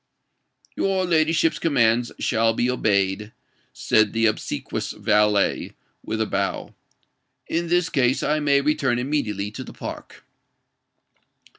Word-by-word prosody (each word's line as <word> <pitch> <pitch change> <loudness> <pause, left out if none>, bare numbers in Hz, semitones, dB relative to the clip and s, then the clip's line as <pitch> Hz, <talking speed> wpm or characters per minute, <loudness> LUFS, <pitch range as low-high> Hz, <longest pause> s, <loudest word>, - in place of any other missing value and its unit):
"Your 190 -1 0
ladyship's 165 -1 +2
commands 120 -6 +2
shall 115 0 +1
be 125 +2 +1
obeyed," 105 -2 0 0.4
said 110 -2 +2
the 115 0 +1
obsequious 110 - -2
valet, 105 -1 +1 0.3
with 110 - -4
a 110 - +1
bow. 100 -2 -3 0.7
"In 170 +1 -1
this 175 0 +2
case, 130 -4 +1
I 155 +1 +1
may 140 -2 +3
return 140 -4 +1
immediately 115 -7 -2
to - - -7
the - - -11
Park." - - -9
120 Hz, 120 wpm, -23 LUFS, 105-150 Hz, 0.7 s, may